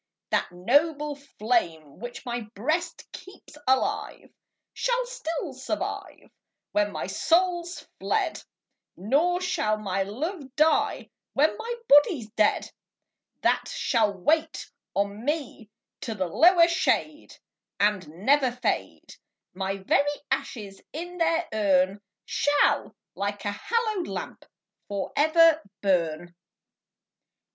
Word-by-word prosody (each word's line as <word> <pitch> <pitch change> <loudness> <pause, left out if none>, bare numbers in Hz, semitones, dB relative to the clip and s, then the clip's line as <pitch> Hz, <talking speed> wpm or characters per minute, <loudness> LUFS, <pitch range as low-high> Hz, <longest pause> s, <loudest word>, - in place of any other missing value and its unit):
That - - +1
noble 290 - +2
flame, 210 - -2
which 240 +3 -8
my 240 -1 -2 0.2
Ijreast 315 - -2
keeps 380 -4 -12
alive. 260 0 0 0.4
Shall - - 0
still 335 - -4
survive 265 +4 -5 0.4
Wlien 205 0 +2
my - - -4
soul's 345 - 0
fled; - - -1 0.5
Nor 310 - +1
shall 215 -13 0
my 195 -2 -2
love 270 - -4
die, 310 +1 +2 0.2
when 300 +3 +4
ray 465 +1 -5
Ijody's 285 - +5
dead; 215 -1 +1 0.7
That - - +2
shall 220 -3 +1
wait 310 - 0 0.2
on 200 +2 -1
me 280 -7 -3 0.3
to 225 - -4
the 190 -2 -1
lower 335 - +6
shade, 310 -2 0 0.4
And 200 -5 +1
never 255 - +2
fade: 250 +1 -3 0.4
My 190 +1 -2
very 285 +9 +2 0.2
ashes 210 -7 -3
in 350 +3 -6
their 330 +1 +2
urn 195 -2 +2 0.2
Shall, 290 0 +2 0.2
like 200 0 -4
a 205 - 0
hallowed 435 - -1
lamp, - - -6 0.4
for 200 -1 -4
ever 320 +1 +5 0.2
burn. 175 -3 0
265 Hz, 110 wpm, -26 LUFS, 205-330 Hz, 0.7 s, lower